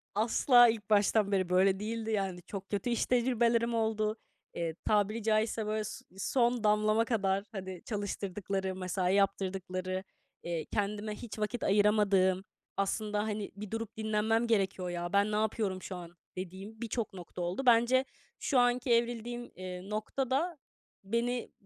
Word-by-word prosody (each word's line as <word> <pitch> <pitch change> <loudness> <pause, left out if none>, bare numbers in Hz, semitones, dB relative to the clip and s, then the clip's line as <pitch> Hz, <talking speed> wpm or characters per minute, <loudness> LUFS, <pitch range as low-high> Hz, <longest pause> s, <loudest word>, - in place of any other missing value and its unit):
Asla 240 +3 +6
ilk 220 -2 -3
baştan 205 0 +3
beri 185 -2 +1
böyle 190 +1 +4
değildi, 225 +1 -3
yani. 195 -4 -1
Çok 195 +2 -8
kötü 205 +4 -1
iş 235 - +1
tecrübelerim 235 -1 +2
oldu. 220 -1 0 0.4
Eee, 165 -2 -3
tabiri 210 +1 +2
caizse, 220 0 +1
böyle, 215 0 -1
s - - -7
son 240 +2 +1
damlama 215 +2 +3
kadar, 195 -4 +1
hani, 190 -3 -6
çalıştırdıkları, 195 -2 -3
mesai 185 0 0
yaptırdıkları, 185 -1 -1 0.4
eee, 170 -2 -3
kendime 210 0 -2
hiç 225 -2 -8
vakit 215 +3 -2
ayıramadığım 200 -2 +3 0.3
aslında, 210 +1 0
hani, 210 -1 -3
"Bir 205 0 -8
durup 225 -1 -4
dinlenmem 220 +1 +1
gerekiyor 195 -4 +1
ya, 175 +1 -4
ben 200 +1 +3
ne - - 0
yapıyorum 210 -3 0
şu 185 - -6
an?" 175 -1 -9 0.2
dediğim 195 +5 -7
birçok 230 -2 -2
nokta 180 -1 -8
oldu. 180 +10 -2
Bence 240 +2 +5 0.3
şu 265 -4 +2
anki 245 +1 +2
evrildiğim, 240 +1 -1
eee, 185 +1 -7
noktada 265 +9 -1 0.5
beni 235 +4 -1
210 Hz, 145 wpm, -31 LUFS, 190-230 Hz, 0.5 s, Asla